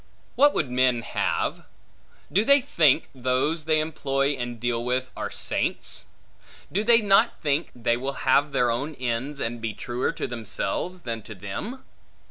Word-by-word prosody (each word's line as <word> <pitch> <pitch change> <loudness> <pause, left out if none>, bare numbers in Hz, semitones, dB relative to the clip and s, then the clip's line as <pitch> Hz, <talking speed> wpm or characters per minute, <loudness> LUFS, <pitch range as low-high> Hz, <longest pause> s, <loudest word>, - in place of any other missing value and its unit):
What 290 +1 +4
would 140 -6 0
men 125 -2 +2
have? - - -1 0.7
Do 200 - +4
they 280 +4 +6
think, 165 - +3
those 130 +5 0
they 155 -1 +3
employ 140 -3 0
and 120 -4 -4
deal 120 0 -1
with, 130 +1 -1
are - - -4
saints? - - -1 0.7
Do 205 +4 0
they 230 0 +6
not 205 +3 +4
think, 150 +1 0
they 120 -1 +1
will 135 +2 -4
have 140 +3 +4
their 125 -3 +2
own 140 +6 -3
ends, 130 +3 -3
and 115 -1 -3
be 110 -2 -3
truer 125 -1 -2
to - - -3
themselves, 120 - -3
than 115 -5 -4
to 110 +1 -10
them? 100 - -6
130 Hz, 160 wpm, -25 LUFS, 120-160 Hz, 0.7 s, they